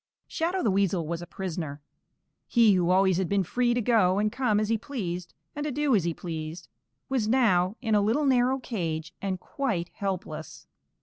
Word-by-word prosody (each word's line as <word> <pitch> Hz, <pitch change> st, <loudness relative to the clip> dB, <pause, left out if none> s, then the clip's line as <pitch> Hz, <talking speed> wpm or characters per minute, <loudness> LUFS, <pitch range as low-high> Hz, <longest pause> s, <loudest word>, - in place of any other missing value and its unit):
_ -, -, -67 dB, 0.2 s
Shadow 355 Hz, +3 st, -1 dB
the 215 Hz, -, +3 dB
Weasel 190 Hz, -3 st, +1 dB
was 170 Hz, +1 st, -3 dB
a 175 Hz, -, -8 dB
prisoner. 165 Hz, -6 st, -5 dB, 0.7 s
He 230 Hz, -4 st, +5 dB
who 180 Hz, -2 st, +2 dB
always 190 Hz, -1 st, +4 dB
had 190 Hz, -2 st, -1 dB
been 200 Hz, -1 st, +2 dB
free 240 Hz, +6 st, +1 dB
to 245 Hz, -, +1 dB
go 205 Hz, -5 st, +3 dB
and 210 Hz, +1 st, +1 dB
come 245 Hz, -5 st, +1 dB
as 215 Hz, 0 st, -1 dB
he 230 Hz, -, +3 dB
pleased 180 Hz, -9 st, -5 dB, 0.2 s
and 290 Hz, -, -3 dB
to 300 Hz, -, -2 dB
do 285 Hz, -2 st, +2 dB
as 185 Hz, -5 st, +2 dB
he 170 Hz, -, +1 dB
pleased 160 Hz, 0 st, -6 dB, 0.4 s
was 255 Hz, -5 st, 0 dB
now 210 Hz, -6 st, +3 dB
in 220 Hz, -2 st, 0 dB
a 210 Hz, -, +5 dB
little 230 Hz, +9 st, +1 dB
narrow 260 Hz, 0 st, +3 dB
cage 165 Hz, -10 st, -4 dB
and 190 Hz, -2 st, -2 dB
quite 205 Hz, -8 st, -2 dB
helpless. 180 Hz, -6 st, -5 dB
200 Hz, 195 wpm, -27 LUFS, 175-245 Hz, 0.7 s, He